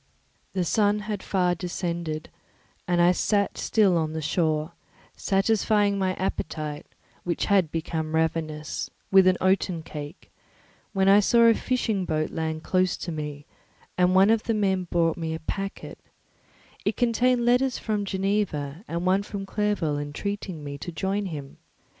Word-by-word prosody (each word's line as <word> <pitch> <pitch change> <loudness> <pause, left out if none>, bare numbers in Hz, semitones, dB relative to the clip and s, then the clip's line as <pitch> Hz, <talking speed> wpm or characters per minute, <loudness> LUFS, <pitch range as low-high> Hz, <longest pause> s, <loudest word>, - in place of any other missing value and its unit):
The 185 -2 0
sun 210 +3 +2
had 210 -2 -4
far 180 -2 +1
descended, 170 -3 -4 0.6
and 175 -1 +2
I 175 +1 +6
still 200 +2 +2
sat - - -6
on 165 -4 +2
the 160 - -3
shore, 155 0 0 0.4
satisfying 205 0 +2
my 185 -1 0
appetite, 155 -4 -4 0.4
which 175 -1 -1
had 195 -5 +3
become 160 -1 -3
ravenous, 155 -1 -2 0.2
with 190 -1 +7
an 185 -1 +4
oaten 185 -3 +1
cake, 150 -1 -9 0.6
when 190 -1 +2
I 200 +1 +7
saw 235 +3 +4
a 230 - +7
fishing 225 -6 -1
boat 155 -2 -1
land 160 0 -3
close 185 0 +1
to 175 - -5
me, 150 -2 -5 0.5
and 180 0 +3
one 195 +3 +6
of 225 -1 +3
the 225 - +1
men 190 -3 +1
brought 165 -2 +1
me 160 -1 -3
a - - -6
packet; 195 +4 -5 0.8
it - - -1
contained 245 0 +2
letters 250 +1 +3
from 210 -2 -2
Geneva, 190 -6 -1
and 170 +1 -3
one 190 +2 +3
from 200 -1 -6
Clerval 195 -8 0
entreating 170 +3 -4
me 140 0 -6
to 175 - -6
join 195 +4 -2
him. 145 -5 -7
185 Hz, 155 wpm, -26 LUFS, 160-200 Hz, 0.8 s, with